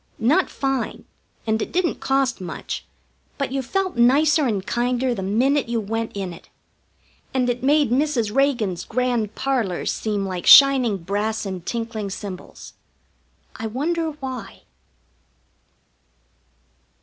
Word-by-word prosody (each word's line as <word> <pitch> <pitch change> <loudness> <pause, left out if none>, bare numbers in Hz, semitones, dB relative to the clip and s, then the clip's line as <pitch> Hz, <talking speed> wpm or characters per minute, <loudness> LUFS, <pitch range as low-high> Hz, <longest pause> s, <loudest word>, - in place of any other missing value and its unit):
Not 295 +11 +2
fine, 270 -2 -2 0.4
and 220 0 0
it - - -4
didn't 350 -2 0
cost 270 -5 0
much, 175 - -6 0.5
but 275 -2 -2
you 270 0 -1
felt 375 +3 -2
nicer 285 +4 +4
and 200 -5 -2
kinder 245 +1 0
the 205 - -4
minute 245 +8 +1
you 235 -1 0
went 225 0 -3
in 190 -3 -4
it. 170 - -15 0.9
And 250 -1 +2
it 245 0 -5
made 285 -1 +3
Mrs. 250 -6 +1
Reagan's 240 -10 +1
grand 235 -3 -1
parlors 245 -9 -1
seem 205 -2 -2
like 185 -2 -4
shining 270 -7 +8
brass 205 +5 -2
and 185 -3 -5
tinkling 225 -3 -3
cymbals. 190 -1 -8 0.8
I 225 - -4
wonder 320 +7 -1
why? 260 -8 -7
240 Hz, 125 wpm, -22 LUFS, 210-275 Hz, 0.9 s, shining